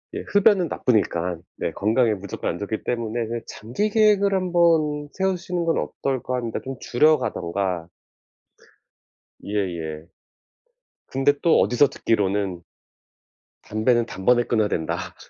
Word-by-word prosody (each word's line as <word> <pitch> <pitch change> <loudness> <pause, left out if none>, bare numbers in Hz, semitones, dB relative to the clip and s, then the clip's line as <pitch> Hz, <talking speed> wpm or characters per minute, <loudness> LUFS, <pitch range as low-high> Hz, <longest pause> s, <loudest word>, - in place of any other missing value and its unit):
예 - - -2
흡연은 200 -3 +4
나쁘니깐 90 - 0
네 - - -2
건강에 110 +3 +2
무조건 100 -1 -4
안 85 - -7
좋기 105 +2 -4
때문에 115 -1 -2
그 115 0 -4
'장기 120 - -3
계획을 210 -2 +3
한번 165 -5 +2
세우시는 185 -2 -1
건 165 - +1
어떨까?' 130 -2 -3
합니다. 115 -2 -3
좀 135 0 -5
줄여 155 +5 +3
가든가. 90 -7 -2 1.6
예예. 85 -6 -3 1.0
근데 135 +2 +2
또 170 - +5
어디서 130 +4 +4
듣기로는 100 -7 -1 1.0
"담배는 115 +2 +1
단번에 120 +5 +2
끊어야 110 -3 +1
된다." 80 -5 -3
120 Hz, 270 characters per minute, -23 LUFS, 100-160 Hz, 1.6 s, 또